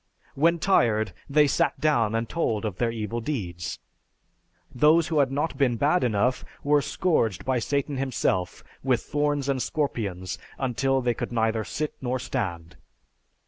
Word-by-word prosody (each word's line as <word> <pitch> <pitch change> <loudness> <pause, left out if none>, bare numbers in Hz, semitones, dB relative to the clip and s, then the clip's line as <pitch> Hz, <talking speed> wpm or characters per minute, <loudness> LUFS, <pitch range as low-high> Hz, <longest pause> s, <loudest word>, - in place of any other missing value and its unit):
When 165 +4 +3
tired, 115 - +2 0.2
they 150 +1 +5
sat 140 - +1
down 120 -7 +2
and 115 0 -1
told 115 -9 -1
of 100 -4 -3
their 120 - +1
evil 115 0 -3
deeds; 95 - -4 1.0
those 155 +5 +4
who 160 -3 +2
had 135 -2 +3
not 145 0 -2
been 125 -4 +2
bad 150 +8 +2
enough 125 +2 +1 0.2
were 145 0 +4
scourged 125 - 0
by 130 -1 +1
Satan 140 +3 -1
himself 120 -9 -1 0.2
with 130 -3 +1
thorns 145 -2 0
and 135 -2 0
scorpions 105 - -2 0.2
until 135 +1 0
they 120 -1 +2
could - - -5
neither 110 -1 +1
sit 150 +7 -3
nor 130 0 -1
stand. 90 -10 -4
130 Hz, 150 wpm, -26 LUFS, 110-145 Hz, 1.0 s, they